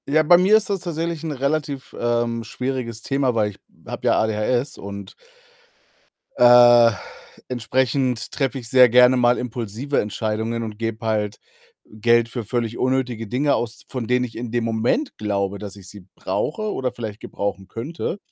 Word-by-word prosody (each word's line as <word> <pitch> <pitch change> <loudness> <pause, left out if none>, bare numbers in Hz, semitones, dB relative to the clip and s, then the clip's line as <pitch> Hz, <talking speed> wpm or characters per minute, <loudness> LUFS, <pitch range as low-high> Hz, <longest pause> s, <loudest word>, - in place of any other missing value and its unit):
Ja, 155 +3 +3
bei 175 +3 +7
mir 200 +4 +6
ist 215 - -3
das 195 - 0
tatsächlich 170 -2 -4
'n 160 - -3
relativ, 140 0 -3
ähm, 120 -1 0
schwieriges 120 -1 -4
Thema, 135 -3 0
weil 105 -2 +1
ich 95 - -18 0.3
habe - - -4
ja - - +4
ADHS 110 +5 -1
und 100 -1 -8 1.2
äh, 120 -1 +7 0.6
entsprechend 125 0 -1
treffe 135 -1 -1
ich 115 -2 -10
sehr 125 -1 +7
gerne 125 +2 +6
mal 120 0 +3
impulsive 120 +3 -3
Entscheidungen 110 +2 -3
und 110 -1 -7
gebe 115 -1 -4
halt 105 -2 -1 0.5
Geld 115 +2 +2
für 120 -2 -5
völlig 115 0 -2
unnötige 125 -3 -1
Dinge 140 +6 +1
aus, 115 -2 -4
von 125 -4 -4
denen 125 +1 +2
ich 115 - -10
in 120 -1 -5
dem 120 0 0
Moment 115 - -1
glaube, 100 -1 -2
dass 100 -1 -8
ich 95 -3 -12
sie 100 -3 -13
brauche 215 +6 -2
oder 130 -1 -2
vielleicht 110 -3 -6
gebrauchen 100 -1 -4
könnte. 150 - -5
120 Hz, 165 wpm, -22 LUFS, 110-130 Hz, 1.2 s, bei